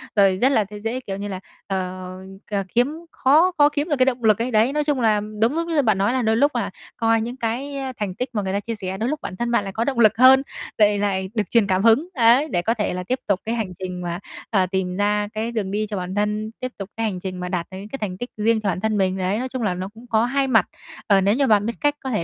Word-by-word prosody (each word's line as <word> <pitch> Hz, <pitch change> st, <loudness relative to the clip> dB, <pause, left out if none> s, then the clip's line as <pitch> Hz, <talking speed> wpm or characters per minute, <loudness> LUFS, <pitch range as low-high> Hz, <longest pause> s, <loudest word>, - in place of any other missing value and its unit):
rồi 195 Hz, -2 st, +4 dB
rất 260 Hz, +6 st, +3 dB
là 220 Hz, -5 st, +3 dB
tê 205 Hz, +1 st, -10 dB
dễ, 225 Hz, +4 st, -3 dB
kiểu 195 Hz, -6 st, -6 dB
như 205 Hz, +1 st, -4 dB
là, 190 Hz, -2 st, -5 dB, 0.3 s
ờ, 185 Hz, -1 st, -4 dB, 0.3 s
c -, -, -1 dB, 0.2 s
kiếm 250 Hz, +5 st, +3 dB, 0.2 s
khó 310 Hz, +8 st, +4 dB
khó 290 Hz, 0 st, +6 dB
kiếm 295 Hz, +3 st, -2 dB
được 290 Hz, -, +2 dB
cái 255 Hz, -, +5 dB
động 245 Hz, -3 st, -1 dB
lực 215 Hz, -2 st, +5 dB
ấy. 250 Hz, +2 st, -1 dB
Đấy, 225 Hz, +5 st, +3 dB
nói 300 Hz, 0 st, +1 dB
chung 290 Hz, -4 st, 0 dB
là 215 Hz, -2 st, +3 dB, 0.2 s
đúng 235 Hz, +5 st, +3 dB
lúc 335 Hz, 0 st, -1 dB
như 320 Hz, -3 st, +2 dB
bạn 215 Hz, -6 st, +2 dB
nói 200 Hz, +5 st, +1 dB
là 260 Hz, -, +1 dB
đôi 220 Hz, 0 st, +2 dB
lúc 290 Hz, +4 st, +2 dB
là -, -, -1 dB, 0.3 s
coi 225 Hz, -1 st, +2 dB
những 240 Hz, +3 st, -5 dB
cái 255 Hz, +5 st, -3 dB, 0.2 s
thành 195 Hz, -3 st, -3 dB
tích 250 Hz, 0 st, -3 dB
mà 210 Hz, -, 0 dB
người 190 Hz, 0 st, -3 dB
ta 200 Hz, -, +1 dB
chia 230 Hz, +2 st, -5 dB
sẻ 190 Hz, -2 st, -5 dB
đôi 230 Hz, +5 st, -1 dB
lúc 305 Hz, 0 st, -2 dB
bản 185 Hz, -, -6 dB
thân 240 Hz, +4 st, -2 dB
bạn 235 Hz, -4 st, +2 dB
lại 195 Hz, -1 st, -6 dB
có 225 Hz, -, 0 dB
động 260 Hz, -2 st, -1 dB
lực 220 Hz, -1 st, +5 dB
hơn, 260 Hz, +1 st, +7 dB, 0.4 s
lại 205 Hz, -1 st, +4 dB
lại 190 Hz, -2 st, -1 dB
được 210 Hz, -, -1 dB
truyền 230 Hz, -4 st, +4 dB
cảm 190 Hz, +1 st, +1 dB
hứng, 230 Hz, +9 st, +4 dB
ấy, 245 Hz, +4 st, +4 dB
để 175 Hz, -, 0 dB
có 225 Hz, +5 st, +1 dB
thể 210 Hz, -5 st, -2 dB
là 180 Hz, -, -4 dB
tiếp 255 Hz, +7 st, -2 dB
tục 200 Hz, -2 st, +2 dB
cái 230 Hz, +1 st, -1 dB
hành 210 Hz, -5 st, -3 dB
trình 180 Hz, -1 st, -5 dB
mà, 175 Hz, +1 st, -4 dB, 0.3 s
ờ, 190 Hz, -4 st, +2 dB
tìm 185 Hz, -1 st, -1 dB
ra 205 Hz, +1 st, +1 dB
cái 225 Hz, +2 st, -2 dB
đường 205 Hz, -4 st, -2 dB
đi 215 Hz, +1 st, -1 dB
cho 205 Hz, -, -3 dB
bản 180 Hz, +2 st, -4 dB
thân, 210 Hz, +1 st, -1 dB
tiếp 255 Hz, 0 st, -4 dB
tục 195 Hz, -1 st, -7 dB
cái 225 Hz, -, 0 dB
hành 190 Hz, -4 st, -2 dB
trình 185 Hz, -1 st, -5 dB
mà 180 Hz, 0 st, -4 dB
đạt 175 Hz, -2 st, -2 dB
được 185 Hz, -, -7 dB
những 200 Hz, +2 st, -9 dB
cái 275 Hz, -, -5 dB
thành 185 Hz, -3 st, -3 dB
tích 245 Hz, +5 st, -6 dB
riêng 220 Hz, +1 st, +2 dB
cho 200 Hz, -, 0 dB
bản 180 Hz, 0 st, -2 dB
thân 220 Hz, -1 st, 0 dB
mình, 190 Hz, -1 st, +1 dB
đấy. 190 Hz, +3 st, 0 dB
Nói 255 Hz, +1 st, -3 dB
chung 255 Hz, -1 st, -4 dB
là 185 Hz, -4 st, +1 dB
nó 185 Hz, +2 st, -5 dB
cũng 235 Hz, +2 st, -14 dB
có 225 Hz, +1 st, +3 dB
hai 270 Hz, +2 st, 0 dB
mặt, 225 Hz, -7 st, +4 dB, 0.4 s
ờ, 195 Hz, -2 st, +5 dB
nếu 200 Hz, +4 st, +3 dB
như 275 Hz, 0 st, +2 dB
bạn 210 Hz, -1 st, +4 dB
biết 235 Hz, -, -1 dB
cách 290 Hz, 0 st, +2 dB
có 265 Hz, -, -3 dB
thể 210 Hz, -8 st, -1 dB
215 Hz, 300 wpm, -22 LUFS, 195-245 Hz, 0.4 s, hơn